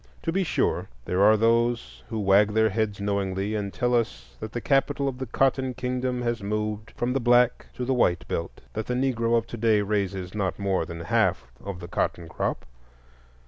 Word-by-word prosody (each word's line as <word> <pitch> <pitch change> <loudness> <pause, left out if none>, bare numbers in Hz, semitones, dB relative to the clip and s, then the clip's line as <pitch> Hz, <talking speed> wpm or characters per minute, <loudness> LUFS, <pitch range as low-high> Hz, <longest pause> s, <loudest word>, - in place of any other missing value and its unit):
To 165 - 0
be 190 +3 +1
sure, 170 - 0 0.2
there 90 +2 0
are 110 +2 +6
those 115 +2 +1
who 110 -2 -3
wag 100 +1 +4
their 110 -1 +4
heads 105 -1 -1
knowingly 100 0 -1
and 100 -2 -2
tell 125 +3 0
us 115 -2 -1
that 110 - -6
the 120 - -3
capital 140 +1 +1
of 130 -1 -3
the 130 - -4
Cotton 130 +1 +1
Kingdom 125 -1 -2
has 120 -2 -1
moved 105 +1 -2
from 120 +1 0
the 135 - +1
Black 120 0 +3
to 125 - -3
the 130 - +1
White 90 -9 +2
Belt,—that 105 +6 -5
the 125 - -1
Negro 120 -3 +1
of 115 - 0
to 120 - -7
day 110 -2 +3
raises 95 -3 -2
not 100 -3 -1
more 95 -4 0
than 85 0 -7
half 80 -6 +1
of 95 -2 -6
the 85 - -7
cotton 85 -1 -2
crop. - - -3
110 Hz, 195 wpm, -26 LUFS, 100-125 Hz, 0.2 s, are